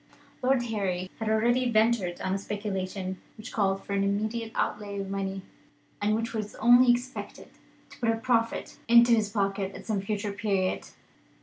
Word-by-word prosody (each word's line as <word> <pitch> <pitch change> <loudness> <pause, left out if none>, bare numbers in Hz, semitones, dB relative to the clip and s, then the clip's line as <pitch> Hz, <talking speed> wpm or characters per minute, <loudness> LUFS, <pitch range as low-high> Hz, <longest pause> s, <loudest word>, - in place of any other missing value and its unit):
Lord 255 -1 +2
Harry 195 -5 -2
had 220 -1 -1
already 240 +3 +2
ventured 220 -5 +2
on 190 - -1
a - - +1
speculation 195 -2 -4 0.2
which 220 +3 -9
called 195 -2 0
for 200 - -5
an 200 0 +2
immediate 220 +3 -1
outlay 205 -1 -2
of 195 0 -4
money, 195 -1 -3 0.6
and 210 +1 +2
which 230 +2 -2
was 215 -2 -4
only 245 +2 +6
expected 245 +2 -4 0.4
to - - -14
put 230 - +1
a 225 - +3
profit 230 -1 0
into 235 +1 +7
his 215 -3 +2
pocket 195 -2 -1
at - - -10
some 210 -3 -1
future 205 +1 -2
period. 200 -3 -1
210 Hz, 170 wpm, -28 LUFS, 195-230 Hz, 0.6 s, into